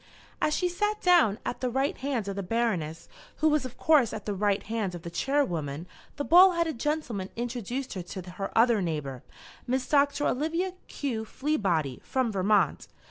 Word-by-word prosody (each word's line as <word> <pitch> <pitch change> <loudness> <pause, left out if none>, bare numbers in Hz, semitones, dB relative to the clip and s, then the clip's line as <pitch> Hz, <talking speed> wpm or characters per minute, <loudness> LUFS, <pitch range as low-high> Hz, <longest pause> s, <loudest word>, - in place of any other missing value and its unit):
As 305 - +2
she 360 - +1
sat 420 +4 -1
down, 345 - +4
at - - -4
the 255 - 0
right 270 +3 0
hand 260 -6 -2
of 200 - -3
the 200 - -2
Baroness, 180 -7 -1 0.3
who 315 - +2
was 300 -3 +1
of 255 - -8
course 290 -9 +4
at 215 -2 -6
the 210 - -1
right 200 0 0
hand 215 -5 -2
of 170 - -9
the 170 - -6
Chairwoman, 170 - -1 0.3
the 285 - -3
bald 360 +2 +7
headed 325 -7 -1
gentleman 245 -11 -2
introduced 245 +2 -4
her 185 - -4
to 180 +1 -8
her 195 +2 -5
other 230 -2 +5
neighbour, 150 -7 -3 0.5
Miss 255 +1 0
Doctor 285 0 +2
Olivia 330 +7 0
Q. 240 -6 -3
Fleabody, 195 - -1
from 255 -3 -1
Vermont. 200 +1 +2
235 Hz, 180 wpm, -28 LUFS, 195-290 Hz, 0.5 s, bald